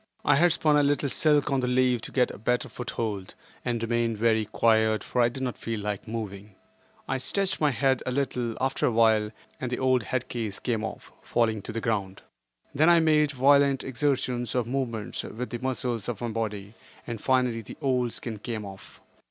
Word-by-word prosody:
I 145 - +5
had 175 +3 +5
spun 150 -1 +3
a - - +5
little 145 0 +1
silk 150 +1 +2
on 135 - +2
the 125 - 0
leaf 125 -1 +2
to - - -8
get 125 -2 +2
a - - -10
better 125 +3 0
foot 125 - -7
hold 105 -5 -4 0.3
and 120 -2 -2
remained 115 -1 0
very 110 0 +2
quiet 110 0 +2
for 125 - 0
I 120 - +4
did 130 +2 -6
not 125 -2 -3
feel 115 -2 -3
like 105 -1 -4
moving. 105 -3 -6 0.5
I 135 - -1
stretched 195 +8 -1
my 150 - +4
head 135 -1 +1
a - - 0
little, 125 -4 -1
after 135 +1 +1
awhile, 110 -2 +3 0.3
and 130 - -3
the 125 - -1
old 130 -1 +2
head 125 +3 -2
case 110 -5 -4
came 115 -3 -2
off, 110 - -7
falling 110 -3 0
to - - -6
the 115 0 -3
ground. 100 -4 -2 0.5
Then 155 +4 +4
I 170 -1 +7
made 155 -2 +3
violent 140 0 +4
exertions, 130 -3 -1
or 125 - +2
movements, 120 -3 -3
with 125 +3 -6
the 120 - -4
muscles 125 -3 -2
of 120 - -4
my 120 - -3
body, 105 -2 -4 0.3
and 115 -3 -5
finally 125 -3 +1
the 105 - -11
old 125 -4 +1
skin 110 -2 -5
came 110 -1 -5
off. 95 -1 -12
120 Hz, 200 wpm, -27 LUFS, 110-130 Hz, 0.5 s, I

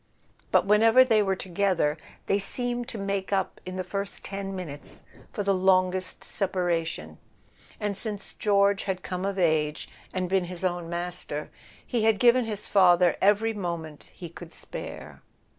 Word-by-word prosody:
But - - +4
whenever 225 +5 +6
they 225 -4 +3
were 195 -2 +1
together 185 -5 0 0.3
they 200 - +2
seemed 245 +4 -3
to 245 - -6
make 195 -1 -2
up 195 -1 -1
in 185 - -5
the 185 - -2
first 200 +2 -4
ten 195 0 -4
minutes 150 -6 -8 0.3
for 205 - -3
the 200 0 +2
longest 185 0 +2
separation; 165 - -2 0.6
and 205 -1 -2
since 205 -1 -5
George 200 -1 +2
had 185 -2 -3
come 185 +1 -3
of 200 0 -2
age, 155 -4 +1 0.2
and 185 -1 -2
been 190 0 +1
his 180 +1 -4
own 175 -2 -1
master, 170 -3 -3 0.3
he 235 -3 -1
had 220 -2 +4
given 245 +2 +5
his 210 -2 -3
father 180 -3 +5
every 210 +3 +3
moment 170 -6 -5
he 175 - -9
could 170 0 -11
spare. - - -8
190 Hz, 160 wpm, -27 LUFS, 175-205 Hz, 0.6 s, whenever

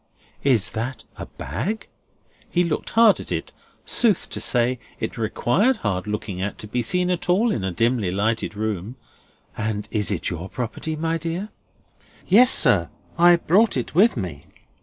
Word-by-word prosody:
Is 115 -5 +2
that 115 +3 -4
a - - -8
bag?" 175 - -4 0.6
he 175 - +2
looked 165 -3 -2
hard 225 -2 +5
at - - -8
it; - - -3 0.3
sooth 220 -7 +2
to - - -2
say, 125 0 +1 0.2
it - - -4
required 125 - +1
hard 100 - -3
looking 105 -3 -4
at 100 +2 -3
to 105 - -8
be 120 +4 -1
seen 180 +9 +1
at 180 0 -3
all 215 +6 +3
in 105 - -2
a 95 - -1
dimly 115 +1 +1
lighted 105 +3 -1
room: 105 +1 -3 0.6
"and 110 -1 -3
is 105 -3 0
it 95 -4 -2
your 90 +2 -6
property, 130 +6 -4
my 165 +1 -1
dear?" 170 +6 -4 0.8
"Yes, 240 +7 +6
sir. - - +4 0.3
I 175 0 +6
brought 190 +3 +2
it 125 - -4
with 195 - +4
me." 90 -9 -5
120 Hz, 165 wpm, -23 LUFS, -, 0.8 s, Yes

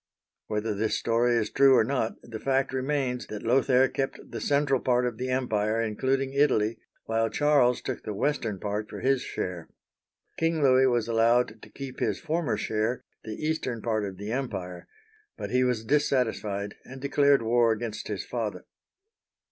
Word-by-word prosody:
Whether 105 0 -1
this 110 +2 0
story 120 +1 +2
is 110 -2 0
true 135 -1 +6
or - - +5
not, 120 -2 -1
the 115 -2 -7
fact 135 +1 0
remains 130 -2 -1
that 105 - -7
Lothair 130 +2 +4
kept 135 0 -4
the 115 - -5
central 140 +1 +2
part 125 0 +2
of 120 -3 -2
the 130 +1 -2
empire, 110 -4 0
including 130 +5 0
Italy, 125 -6 +2 0.3
while 115 0 +1
Charles 135 0 +3
took 130 - -4
the 105 - -5
western 115 -5 -1
part 105 +2 -3
for - - -7
his 135 -1 +2
share. 90 -3 -5 0.7
King 165 -2 +1
Louis 130 -1 +5
was 120 -3 +1
allowed 115 -1 +2
to - - -13
keep 135 -2 -8
his - - 0
former 165 -7 -1
share, 110 +3 -1 0.2
the 110 - -6
eastern 140 -7 -1
part 110 -1 -1
of 95 -2 -5
the 100 +3 -5
empire; 95 -9 -4 0.5
but 100 - -5
he 125 +1 +3
was 125 -3 0
dissatisfied, 110 -7 0
and 130 +1 -10
declared 140 -1 +3
war 115 0 +3
against 110 0 -4
his - - -4
father. - - -4
120 Hz, 170 wpm, -27 LUFS, 110-135 Hz, 0.7 s, true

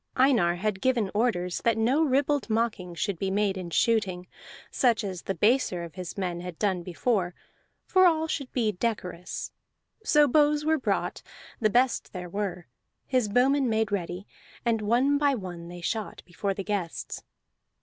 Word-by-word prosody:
Einar 240 -10 +4
had 195 +1 -2
given 235 -7 +1
orders 195 -6 0
that 230 -1 +2
no 245 +7 +2
ribald 285 -1 +1
mocking 215 -6 -1
should 190 0 -2
be 195 - -1
made 200 0 +1
in 185 -2 -5
shooting, 190 -2 +1 0.5
such 235 -4 +2
as 185 -3 -4
the 195 - -3
baser 205 -3 +2
of 170 -2 -8
his 185 0 -7
men 175 -3 -2
had 180 -2 -7
done 190 -4 0
before, 180 +1 -1 0.5
for 370 -1 +5
all 320 -2 +2
should 275 -4 -3
be 225 -4 +1
decorous. 180 -4 -4 0.5
So 295 -7 +5
bows 295 +2 +3
were 315 0 +2
brought, - - -1 0.4
the 215 - +3
best 245 +3 +1
there 180 -2 -6
were; 190 -2 -3 0.4
his 255 -5 +1
bowmen 260 +4 +3
made 220 -2 +1
ready, 185 -1 -3 0.4
and 230 -2 +1
one 250 +7 +2
by 285 -2 +3
one 175 -6 -7
they 175 0 -9
shot 215 +5 -3
before 195 +3 -3
the 195 - -4
guests. 195 -5 -3
210 Hz, 165 wpm, -27 LUFS, 180-255 Hz, 0.5 s, for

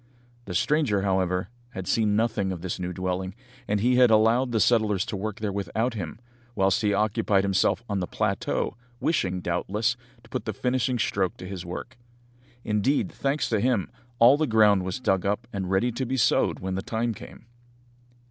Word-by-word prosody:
The 90 - -5
stranger, 130 - +2
however, 95 -1 0 0.2
had 95 -2 -6
seen 105 0 +2
nothing 110 -3 0
of 90 -2 -6
his 90 0 -3
new 90 0 -3
dwelling, 95 +1 -3 0.3
and 105 0 +1
he 125 +4 +3
had 125 -1 +6
allowed 115 +4 +4
the 115 - +1
settlers 110 -4 +2
to 115 - -4
work 105 +2 -4
there 105 -2 -1
without 100 +5 -1
him, 95 -3 -6 0.4
whilst 95 -2 +2
he 105 - +2
occupied 105 -1 +2
himself 100 +3 +1
on 100 -2 -1
the 90 - -2
plateau, 100 -3 -1 0.2
wishing, 95 - 0
doubtless, 105 +7 -1 0.3
to 110 - -19
put 125 -4 -3
the 110 - -2
finishing 125 +3 0
stroke 95 -4 0
to 90 - -8
his 95 -2 -6
work. 120 +8 -7 0.6
Indeed, 110 +7 +1
thanks 140 +2 -1
to 110 - +1
him, 120 -4 0 0.3
all 120 +5 +7
the 155 0 +1
ground 105 -4 +5
was 95 +5 -3
dug 95 -7 +1
up 105 +4 -1
and 95 -2 -3
ready 95 +6 +2
to 130 +3 -3
be 130 +2 -1
sowed 115 - +2
when 95 0 -3
the 95 - -2
time 115 +3 -2
came. 110 - -12
105 Hz, 185 wpm, -26 LUFS, 95-115 Hz, 0.6 s, all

